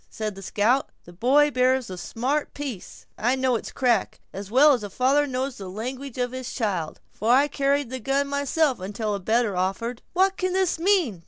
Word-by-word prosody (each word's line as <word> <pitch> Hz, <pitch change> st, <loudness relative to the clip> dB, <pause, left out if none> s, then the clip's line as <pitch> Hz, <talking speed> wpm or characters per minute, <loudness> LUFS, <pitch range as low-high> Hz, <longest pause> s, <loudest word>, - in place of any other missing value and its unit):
said 215 Hz, -1 st, -4 dB
the 195 Hz, -, -11 dB
scout; 220 Hz, +7 st, +1 dB
"the 175 Hz, -, -14 dB
boy 275 Hz, +10 st, +3 dB
bears 255 Hz, -1 st, +2 dB
a -, -, -5 dB
smart 255 Hz, +11 st, -2 dB
piece! 270 Hz, -10 st, -7 dB
I 245 Hz, +4 st, +2 dB
know 260 Hz, -1 st, +1 dB
its 225 Hz, -, -4 dB
crack, 240 Hz, -5 st, 0 dB
as 195 Hz, 0 st, -7 dB
well 280 Hz, +6 st, +6 dB
as 245 Hz, -, -1 dB
a 205 Hz, -, -6 dB
father 270 Hz, +7 st, +2 dB
knows 260 Hz, 0 st, -3 dB
the 190 Hz, -2 st, -7 dB
language 255 Hz, +6 st, -6 dB
of 245 Hz, -1 st, -1 dB
his 255 Hz, -1 st, -6 dB
child, 190 Hz, -10 st, -2 dB
for 220 Hz, +3 st, 0 dB
I 275 Hz, +4 st, +5 dB
carried 280 Hz, -2 st, 0 dB
the 260 Hz, -, -4 dB
gun 275 Hz, +4 st, 0 dB
myself 280 Hz, -1 st, 0 dB
until 205 Hz, +3 st, -3 dB
a 200 Hz, -, -2 dB
better 220 Hz, +1 st, +1 dB
offered." 195 Hz, +7 st, -2 dB
"What 385 Hz, +2 st, +2 dB
can 370 Hz, 0 st, -1 dB
this 375 Hz, -3 st, +1 dB
mean?" 340 Hz, -, +2 dB
255 Hz, 200 wpm, -25 LUFS, 215-280 Hz, -, well